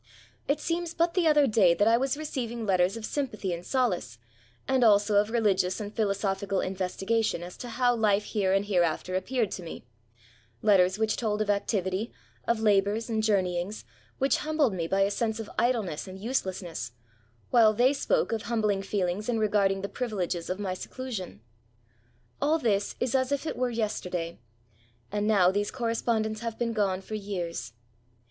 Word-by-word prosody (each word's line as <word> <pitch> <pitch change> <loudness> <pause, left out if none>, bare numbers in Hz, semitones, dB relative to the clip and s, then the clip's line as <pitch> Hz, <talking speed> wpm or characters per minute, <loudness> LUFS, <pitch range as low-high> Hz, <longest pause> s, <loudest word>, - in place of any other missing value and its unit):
It 285 +1 +1
seems 335 +1 -2
but 335 0 +2
the 360 -3 +2
other 300 -2 +5
day 205 -8 +4
that 205 - +3
I 230 - +6
was 270 +3 0
receiving 240 -7 -4
letters 185 +1 +2
of 220 - -5
sympathy 215 -10 -2
and 170 0 -5
solace, 180 - -1 0.5
and 265 -1 +3
also 205 -1 +5
of 205 +1 +3
religious 205 -5 +1
and 210 0 -6
philosophical 200 -2 0
investigation 190 +2 -1
as 175 +1 -8
to 245 - -7
how 245 +1 +2
life 210 -2 +2
here 200 -4 0
and 195 +1 +2
hereafter 180 -2 0
appeared 225 +3 0
to - - -5
me; 165 -7 -8 0.8
letters 190 -2 +4
which 220 0 0
told 215 -3 -1
of 210 -1 +2
activity, 200 +1 -1 0.4
of 235 -1 +2
labours, 210 +2 +2
and 220 -1 +1
journeyings, 190 -2 0 0.3
which 270 +1 +2
humbled 305 -7 +1
me 170 -3 -2
by 195 +3 +1
a 200 +1 +3
sense 220 +1 -1
of 220 - -6
idleness 220 -10 0
anduselessness, 185 - -3 0.6
while 230 -3 +6
they 245 +5 +3
spoke 480 - 0
of 225 -1 -1
humbling 215 -4 0
feelings 195 +1 -2
in 235 - +1
regarding 200 -3 +2
the 200 - -3
privileges 190 -8 -3
of 185 - -1
my 195 -3 -2
seclusion. 210 - -6 1.0
All 310 +3 +3
this 210 -9 0
is 250 -2 -1
as 260 0 +1
if 285 +2 -1
it - - -3
were 255 0 0
yesterday: 180 -7 -3 0.7
and 205 +1 -1
now, 190 -4 +5
these 205 +1 -1
correspondents 230 -2 -1
have 230 -1 -4
been 230 -1 -1
gone 195 -3 0
for 205 - -9
years. 175 - -4
210 Hz, 170 wpm, -28 LUFS, 190-235 Hz, 1.0 s, I